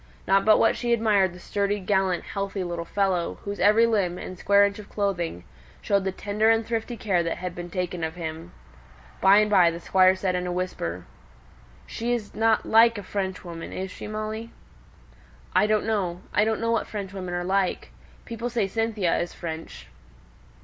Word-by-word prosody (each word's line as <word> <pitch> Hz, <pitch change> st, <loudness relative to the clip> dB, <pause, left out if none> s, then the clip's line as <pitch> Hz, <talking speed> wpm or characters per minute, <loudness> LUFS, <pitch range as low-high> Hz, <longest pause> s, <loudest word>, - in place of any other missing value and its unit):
Not 195 Hz, 0 st, +3 dB
but 215 Hz, 0 st, +6 dB
what -, -, +3 dB
she 240 Hz, -1 st, 0 dB
admired 210 Hz, -5 st, +3 dB
the 180 Hz, -, -12 dB
sturdy, 200 Hz, +2 st, -1 dB
gallant, 190 Hz, -2 st, 0 dB
healthy 195 Hz, -1 st, -4 dB
little 170 Hz, -1 st, -4 dB
fellow, 190 Hz, -2 st, 0 dB
whose 200 Hz, -1 st, -5 dB
every 215 Hz, +4 st, +5 dB
limb, 200 Hz, -6 st, 0 dB
and 185 Hz, -, -7 dB
square 200 Hz, +2 st, +4 dB
inch 200 Hz, +1 st, -3 dB
of 205 Hz, -, -11 dB
clothing, 175 Hz, -, -2 dB, 0.4 s
showed 200 Hz, -1 st, 0 dB
the 190 Hz, -, 0 dB
tender 210 Hz, +3 st, 0 dB
and 225 Hz, 0 st, +3 dB
thrifty 230 Hz, +1 st, -3 dB
care 195 Hz, -6 st, +1 dB
that 165 Hz, -1 st, -2 dB
had 180 Hz, -1 st, -5 dB
been 175 Hz, 0 st, -7 dB
taken 180 Hz, -1 st, -3 dB
of 160 Hz, +1 st, -3 dB
him. 165 Hz, 0 st, -6 dB, 0.7 s
By 195 Hz, +1 st, +7 dB
and 210 Hz, 0 st, +3 dB
by 180 Hz, -4 st, +6 dB
the 170 Hz, 0 st, -5 dB
Squire 185 Hz, +2 st, +4 dB
said 185 Hz, -1 st, -1 dB
in 180 Hz, 0 st, -2 dB
a -, -, -2 dB
whisper, 175 Hz, -, -3 dB, 0.8 s
"She's 235 Hz, -2 st, -3 dB
not 220 Hz, 0 st, +2 dB
like 230 Hz, 0 st, +5 dB
a 205 Hz, -, -6 dB
Frenchwoman, 185 Hz, -4 st, -5 dB
is 190 Hz, 0 st, -5 dB
she, -, -, -8 dB
Molly?" 215 Hz, +2 st, -5 dB, 1.0 s
"I 210 Hz, -, +4 dB
don't 215 Hz, -1 st, +1 dB
know. 185 Hz, -5 st, -1 dB
I 205 Hz, -, +3 dB
don't 220 Hz, 0 st, 0 dB
know 230 Hz, 0 st, 0 dB
what 230 Hz, -, 0 dB
Frenchwomen 190 Hz, -3 st, -5 dB
are 175 Hz, -, -2 dB
like. 190 Hz, 0 st, -1 dB, 0.3 s
People 235 Hz, +1 st, -4 dB
say 230 Hz, -4 st, 0 dB
Cynthia 215 Hz, -3 st, 0 dB
is 175 Hz, -, -3 dB
French." 160 Hz, -1 st, -7 dB
195 Hz, 185 wpm, -25 LUFS, 180-215 Hz, 1.0 s, By